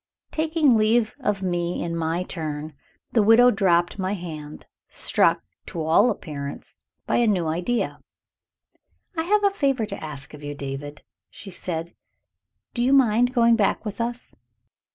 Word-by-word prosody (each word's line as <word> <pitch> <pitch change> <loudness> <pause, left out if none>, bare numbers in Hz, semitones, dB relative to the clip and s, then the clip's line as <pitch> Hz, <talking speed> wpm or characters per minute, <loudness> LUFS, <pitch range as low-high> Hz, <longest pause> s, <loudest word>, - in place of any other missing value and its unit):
Taking 315 -3 +2
leave 220 0 +3
of 210 -7 -1
me 175 -1 -1
in 170 0 -3
my 165 +2 -1
turn, 155 -3 -5 0.4
the 230 - +3
widow 225 +4 +6
dropped 180 -3 +2
my 190 +1 -1
hand, 155 -5 -7 0.2
struck, - - +1 0.2
to 165 - -4
all 160 +10 +4
appearance, 140 -7 -6 0.3
by - - +1
a 240 - +3
new 185 -5 +1
idea. 175 +10 -1 1.2
"I 325 - 0
have 415 +5 +2
a 400 - +4
favor 275 - 0
to 200 -4 -7
ask 145 -3 -7
of 150 - -11
you, 145 0 -6
David," 145 +1 -7 0.3
she 195 - -11
said. 170 -2 -5 0.8
"Do 240 - -2
you 260 +2 +3
mind 245 -2 +4
going 235 -2 +4
back 215 0 +1
with 210 +2 -4
us?" 240 +1 -4
195 Hz, 155 wpm, -24 LUFS, 160-240 Hz, 1.2 s, widow